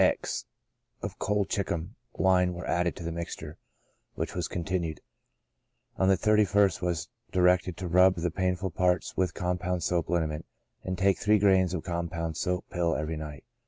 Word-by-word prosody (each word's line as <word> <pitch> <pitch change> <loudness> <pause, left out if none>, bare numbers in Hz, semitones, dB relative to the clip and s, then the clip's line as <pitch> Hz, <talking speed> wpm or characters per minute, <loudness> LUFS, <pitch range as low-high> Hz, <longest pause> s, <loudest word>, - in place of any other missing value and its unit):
x - - 0 0.6
of - - -5
colchicum 100 -3 -1 0.2
wine 90 -1 +3
were 90 - -6
added 85 0 0
to - - -8
the 85 - -3
mixture, 80 -2 -6 0.6
which - - -3
was 90 -2 -2
con 85 - -4
tinued; 85 -3 -2 1.0
on 95 - +2
the 95 - +5
31st, 100 -3 +3
was 90 -3 -1 0.2
directed 90 -1 +3
to 90 - -4
rub 90 +2 +5
the 85 0 -1
painful 95 +1 -1
parts 90 +1 +1
with 95 -1 0
compound 90 0 -1
soap 85 0 0
liniment, 80 -3 0 0.4
and 95 0 -3
take 95 +1 +3
three 105 +1 +4
grains 95 -3 +3
of 80 - -4
com 85 -1 -2
pound 85 -2 -3
soap 90 +2 -1
pill 85 -2 +1
every 75 +2 -2
night. 75 -3 -7
90 Hz, 165 wpm, -28 LUFS, 85-95 Hz, 1.0 s, the